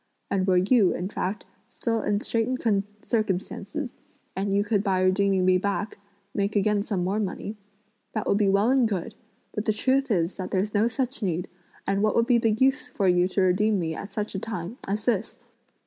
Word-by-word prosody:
And 190 -1 +1
were 185 -1 +4
you, 195 +1 +4
in 180 +2 -3
fact, 195 0 -3 0.2
still 230 -2 -1
in 205 0 0
straitened 225 -4 0 0.2
circumstances, 215 - -2 0.4
and 195 +2 -1
you 200 +1 +3
could 205 -1 +1
by 190 -3 +1
redeeming 190 0 +2
me 185 0 +4
back, 200 +2 -2 0.3
make 200 +1 -1
again 205 0 +2
some 200 -4 -2
more 195 +4 0
money, 205 +1 -3 0.6
that 215 - -2
would 200 - +2
be 205 -2 +3
well 200 +5 +3
and 260 -4 +3
good; 200 +2 -3 0.4
but 210 - -3
the 215 - +2
truth 265 +5 +1
is 175 -4 0
that 185 - -4
there's 200 +2 -1
no 210 +2 +3
such 255 +2 -2
need, 180 -3 -1 0.4
and 195 0 +1
what 215 0 +2
would 230 - +4
be 240 -1 +4
the 225 - +2
use 265 +4 +2
for 195 - -1
you 180 0 +4
to 190 +1 0
redeem 200 +3 +3
me 165 -3 -1
at 200 - -6
such 210 +1 -4
a 195 - -2
time 215 +1 -5
as 205 +2 -2
this? 225 -3 0
205 Hz, 200 wpm, -26 LUFS, 190-225 Hz, 0.6 s, were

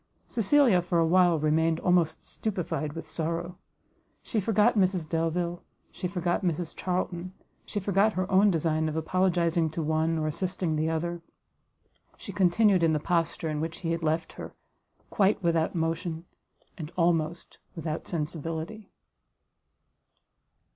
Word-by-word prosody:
Cecilia 230 -3 +3
for 175 0 -1
a 165 - +4
while 175 0 +4
remained 160 +2 +2
almost 175 -3 +1
stupified 175 -7 -3
with 160 -1 -8
sorrow; 170 +2 -3 0.6
she 225 - -1
forgot 215 +3 +3
Mrs 185 -5 +1
Delvile, 170 +2 -1 0.3
she 180 - -4
forgot 175 -1 -1
Mrs 175 -2 -2
Charlton, 180 0 -3 0.3
she 205 - -2
forgot 200 +2 +2
her 185 0 -1
own 195 +2 +5
design 160 -2 +1
of 155 - -5
apologizing 170 0 +1
to 160 +1 -4
one, 160 +1 +1
or 155 - -1
assisting 175 +1 -2
the 155 +1 0
other: 170 +1 -2 1.0
she - - -8
continued 190 +1 +3
in 165 -1 +3
the 155 - +1
posture 170 0 0
in 150 -1 -2
which 160 0 -5
he 165 -2 -1
had 165 0 -1
left 160 +1 -1
her, - - -9 0.6
quite 200 -2 +2
without 165 -1 +1
motion, 165 0 -2 0.5
and 155 0 -6
almost 170 -1 0 0.2
without 160 -1 -4
sensibility. 165 +5 -4
170 Hz, 140 wpm, -28 LUFS, 160-185 Hz, 1.0 s, own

